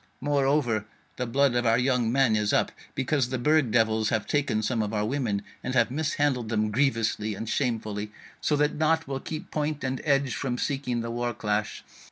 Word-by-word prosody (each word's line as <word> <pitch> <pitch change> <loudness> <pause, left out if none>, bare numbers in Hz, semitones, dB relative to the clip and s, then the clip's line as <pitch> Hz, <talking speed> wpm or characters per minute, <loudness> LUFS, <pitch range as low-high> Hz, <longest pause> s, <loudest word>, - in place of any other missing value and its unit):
Moreover, 135 -6 +1 0.3
the 125 - -2
blood 135 +2 +3
of 120 0 +1
our 115 0 +4
young 125 -2 +1
men 130 -3 +3
is 105 -1 +1
up, - - +2 0.2
because 130 -1 0
the 130 - -1
Burg 150 +1 +3
devils 110 -1 +2
have 110 -1 0
taken 140 -7 0
some 115 +1 0
of 105 +1 -2
our 105 0 +1
women, 110 -5 -1 0.2
and 130 - -3
have 120 -1 +3
mishandled 145 -5 0
them 110 -1 0
grievously 115 -4 0
and 115 - -6
shamefully, 110 -5 -2 0.3
so 150 - +2
that 150 +1 +2
naught 160 0 +1
will 135 -1 -3
keep 155 +3 -7
point 150 -1 -2
and 130 0 -2
edge 140 -3 +2
from 125 -3 -2
seeking 125 -3 -1
the 115 0 -4
war 120 0 -2
clash. 105 0 -2
125 Hz, 195 wpm, -27 LUFS, 110-140 Hz, 0.3 s, our